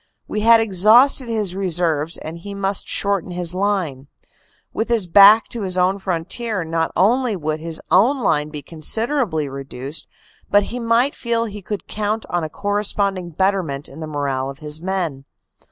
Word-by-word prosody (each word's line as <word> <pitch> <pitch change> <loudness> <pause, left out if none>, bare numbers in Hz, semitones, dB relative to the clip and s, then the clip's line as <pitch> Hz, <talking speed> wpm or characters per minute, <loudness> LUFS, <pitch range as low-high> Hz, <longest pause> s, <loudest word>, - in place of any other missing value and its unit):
We 210 - -3
had 230 +1 +6
exhausted 225 +6 +4
his 210 -5 -2
reserves 170 -4 0
and 160 +2 -8
he 200 +3 -8
must 200 0 -1
shorten 200 -3 0
his 175 -1 0
line. 185 -9 -2 0.7
With 225 - -2
his 225 -6 +1
back 205 +5 +7
to 235 - -4
his 185 -2 0
own 185 +2 +2
frontier 190 +3 -3
not 165 0 -2
only 235 +4 +2
would 155 -3 -3
his 165 0 -3
own 245 +8 +3
line 150 -5 +1
be 150 -2 -8
considerably 185 - -1
reduced 135 +1 -6 0.4
but 205 0 +4
he 245 - -3
might 235 +4 +2
feel 230 -1 -1
he 210 -2 -8
could 205 +2 -6
count 215 +1 -2
on 175 -1 -1
a 155 - -4
corresponding 200 -1 0
betterment 170 -5 -1
in 140 - -12
the 160 - -6
morale 140 -3 -2
of 135 - -9
his 150 +1 -3
men. 175 -7 -3
190 Hz, 170 wpm, -20 LUFS, 160-215 Hz, 0.7 s, back